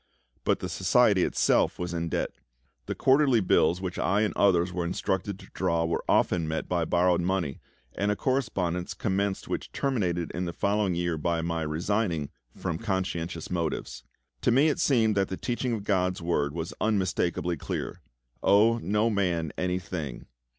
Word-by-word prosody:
But - - +1
the - - -2
Society - - +3
itself - - +2
was 90 0 -4
in 85 -1 -2
debt. - - -1 0.6
The - - -2
quarterly 135 -2 +4
bills 90 -2 +3
which 90 -2 -4
I 100 +3 +2
and 110 - 0
others 90 -2 +3
were 90 -1 -1
instructed 95 +2 -2
to - - -15
draw 85 0 +1
were 80 - -1
often 85 -3 +2
met 80 0 -2
by 85 -2 0
borrowed 90 +1 +2
money, 85 -6 -1 0.3
and 100 - -1
a 105 - +2
correspondence 100 -10 -1
commenced 100 -3 -1
which - - -4
terminated 90 -11 -1
in 90 +2 -3
the 85 - -4
following 100 -1 +1
year 85 -2 -1
by 85 +1 0
my 85 -1 -1
resigning 80 0 -1 0.3
from 80 -1 -3
conscientious 90 -6 -3
motives. 80 -7 -2 0.4
To - - +2
me 135 +6 +5
it 150 - -1
seemed 115 -6 +3
that 95 -1 +2
the 95 - -5
teaching 120 0 -2
of 110 -3 -3
GOD'S 90 -2 +1
Word 85 -4 0
was 85 0 -4
unmistakably 90 -4 0
clear: 75 - -5 0.4
"Owe 110 +4 +4
no 105 +5 +1
man 85 -6 0
any 90 0 -1
thing." 80 -8 -5
90 Hz, 170 wpm, -27 LUFS, 85-105 Hz, 0.6 s, me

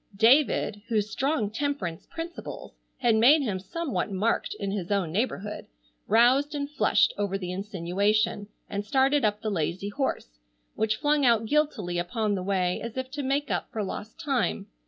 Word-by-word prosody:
David, 225 -3 +4
whose 215 -2 0
strong 270 -7 0
temperance 220 - -3
principles 335 +1 -7 0.2
had 240 -3 +3
made 265 +8 +6
him 200 -7 -2
somewhat 270 - -3
marked 200 +4 0
in 200 -1 -2
his 195 -4 -3
own 195 -6 0
neighborhood, 210 0 -2 0.4
roused 255 +7 +4
and 285 -1 -2
flushed 285 -7 +2
over 200 -1 0
the 180 -2 -5
insinuation, 200 +2 0 0.2
and 200 0 -3
started 270 +6 +2
up 210 -1 +1
the 215 - -1
lazy 180 +2 -2
horse, 205 - -3 0.3
which 215 0 0
flung 290 +5 +1
out 230 -3 +4
guiltily 220 -11 0
upon 215 +4 -1
the 190 - -1
way 185 -1 0
as 230 +1 -6
if 260 0 -4
to 290 - -4
make 280 +2 -1
up - - -2
for 215 - -2
lost 205 +3 -6
time. 255 - -1
215 Hz, 165 wpm, -27 LUFS, 195-270 Hz, 0.4 s, made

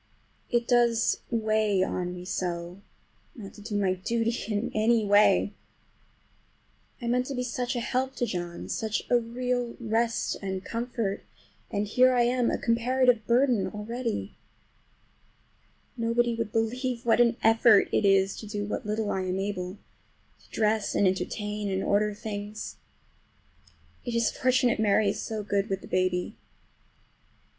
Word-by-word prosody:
It 240 -1 +1
does 235 -2 +3
weigh 215 -4 +1
on 180 -1 -3
me 180 0 -8
so 175 0 -4 0.5
not 200 -4 -9
to 210 - -13
do 205 0 -5
my 195 -2 +2
duty 230 +5 -1 0.2
in 210 +2 -1
any 220 0 +2
way! 205 +1 +4 1.5
I 240 - -7
meant 250 +2 +1
to 275 - -4
be 250 - -1
such 250 +1 -2
a - - 0
help 260 +2 -1
to 245 - 0
John, 175 -5 -5
such 220 -1 -2
a 245 - +5
real 245 +1 -2
rest 230 0 0
and 190 -1 -4
comfort, 230 -4 -3 0.5
and 205 +1 -1
here 255 +4 +4
I 240 - +4
am 245 0 +2
a - - 0
comparative 240 -1 +2
burden 240 -3 +3
already! 230 +2 -4 1.6
Nobody 235 0 +1
would 230 -2 -3
believe 240 +2 -1
what 235 +1 +4
an 235 0 +3
effort 225 -2 +5
it - - +2
is 195 -1 +3
to 215 - -8
do 205 -1 -3
what 210 - -4
little 210 0 -1
I 190 - -1
am 185 0 -2
able—to 195 0 -8
dress 215 -1 0
and 205 - +4
entertain, 210 +2 -2
and 190 0 -1
order 210 +1 +1
things. 210 0 -6 1.3
It 240 -2 -4
is 230 -1 +2
fortunate 255 -3 +2
Mary 210 -1 +3
is 205 - -3
so 215 -1 -4
good 200 0 -1
with 195 -1 -2
the - - -11
baby. 185 -1 0
220 Hz, 150 wpm, -27 LUFS, 200-240 Hz, 1.6 s, a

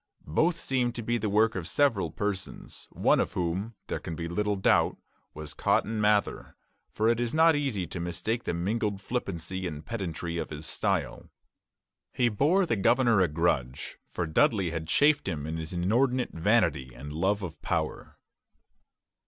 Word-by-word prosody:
Both 165 - +2
seem 125 -5 0
to 120 - -5
be 120 +2 0
the 105 -1 -1
work 110 +2 +3
of 90 -4 -4
several 115 - +2
persons, 100 +3 -5
one - - +2
of - - -1
whom, 95 +6 -2
there - - -3
can 80 - -6
be 85 +1 -4
little 105 +4 0
doubt, 95 - +2 0.4
was 75 -1 -6
Cotton 110 0 +1
Mather; 105 -1 +1 0.4
for 110 - 0
it 115 0 +3
is 120 +3 -1
not 160 0 +6
easy 135 -11 -1
to 85 - -6
mistake 100 +8 -2
the - - -1
mingled 100 +3 -1
flippancy 95 -5 -3
and 75 -2 -7
pedantry 85 -6 -4
of - - -4
his 75 0 -6
style. - - -1 0.8
He 120 -1 +2
bore 155 - +3
the 115 - 0
governor 120 +2 +3
a 95 - +4
grudge, 75 -6 -1
for 85 - -2
Dudley 90 +3 +2
had 80 -1 -4
chafed 145 - +3
him 75 -6 -3
in 80 +1 -3
his 80 -1 -5
inordinate 120 +9 +1
vanity 80 - +1
and 70 +4 -8
love 95 +5 0
of 85 -3 -7
power. - - -3
100 Hz, 170 wpm, -28 LUFS, 85-115 Hz, 0.8 s, not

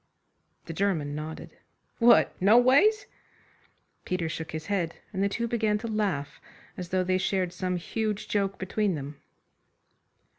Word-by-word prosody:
The 165 - -6
German 165 -6 0
nodded. 155 +2 -7 0.4
"What! 240 0 +6
Noways?" 260 - +5 1.0
Peter 180 -3 -2
shook 160 0 -5
his 155 -1 -5
head, 185 -5 -1 0.2
and 190 - -2
the 200 - +2
two 235 +4 -2
began 220 -3 +1
to 230 - -6
laugh 190 -10 -2 0.3
as 180 -2 -7
though 185 0 +1
they 185 0 +1
shared 185 -2 0
some 180 0 -2
huge 210 +4 -3
joke 195 -2 -1
between 190 0 -1
them. 145 0 -7
190 Hz, 140 wpm, -27 LUFS, 165-215 Hz, 1.0 s, What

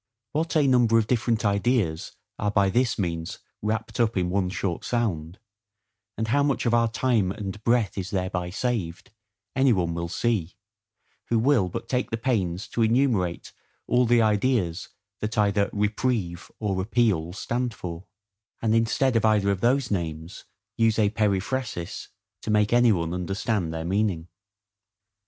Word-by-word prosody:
What 165 +3 -1
a 150 -2 +4
number 120 -4 +4
of 110 - +3
different 115 -1 0
ideas 100 -5 0 0.3
are 105 - 0
by 100 -2 +2
this 120 +2 +1
means 85 -5 -3 0.2
wrapped 110 +1 -3
up 115 -3 +2
in 90 -1 0
one 95 -1 +1
short 90 -1 -3
sound, 95 -8 -2 0.8
and 110 0 -2
how 145 +5 +3
much 140 -2 0
of 120 - +2
our 115 0 +4
time 115 -5 +1
and 100 +1 -6
breath 115 -5 +1
is 95 -1 -4
thereby 90 -2 -2
saved, 95 -5 -3 0.4
any 135 0 +4
one 90 -6 +1
will 85 0 -3
see, 95 -4 -1 0.7
who 115 - +1
will 115 -5 +3
but - - -6
take 125 -1 -1
the 115 - -2
pains 100 -7 -1
to 120 - -2
enumerate 110 -7 +1 0.3
all 125 0 +2
the 120 -1 +4
ideas 105 -5 0 0.3
that 110 +1 -4
either 100 -1 +2
REPRIEVE 105 -4 -1
or 95 -4 -1
APPEAL 95 -6 +1
stand 120 +5 -2
for; 90 -3 -7 0.5
and 110 -1 +1
instead 115 +3 +2
of 115 - +2
either 105 -2 +3
of 95 -2 -2
those 125 0 +2
names, 80 -2 -4 0.3
use 115 -1 +3
a 105 -2 +3
periphrasis, 105 -2 -2 0.3
to - - -6
make 105 +1 +2
any 120 -1 +5
one 85 -3 -1
understand 95 0 -2
their 80 0 -4
meaning. 95 -3 0
105 Hz, 155 wpm, -25 LUFS, 90-120 Hz, 0.8 s, any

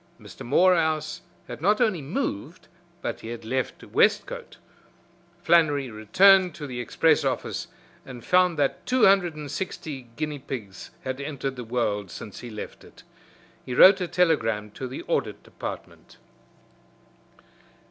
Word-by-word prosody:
Mr. - - -11
Morehouse 160 +1 +2 0.3
had - - -8
not 210 +5 +3
only 215 -9 +1
moved, 155 - -4 0.4
but - - -3
he - - -10
had 115 -1 -7
left 130 +2 -3
Westcote. - - 0 0.9
Flannery 145 -6 +3
returned 180 - +4
to 150 - -7
the 125 -3 -6
express 120 - +2
office - - -2 0.4
and 125 -3 -11
found 180 -2 +3
that 140 -2 0
two 255 -1 +4
hundred 190 -4 +4
and 150 -2 -7
six 190 +4 -4 0.4
guinea 150 0 -3
pigs 110 -8 -7
had 130 +1 -4
entered 140 -2 -4
the 125 - -6
world 110 -4 -2
since 100 +4 -9
he 120 - -8
left 105 -2 -8
it. - - -17 0.6
He 125 - -5
wrote 190 +6 +8
a 180 - -1
telegram 115 - +1
to 130 +5 -6
the 130 - -7
Audit - - -2
Department. - - -9
145 Hz, 140 wpm, -25 LUFS, 120-175 Hz, 0.9 s, wrote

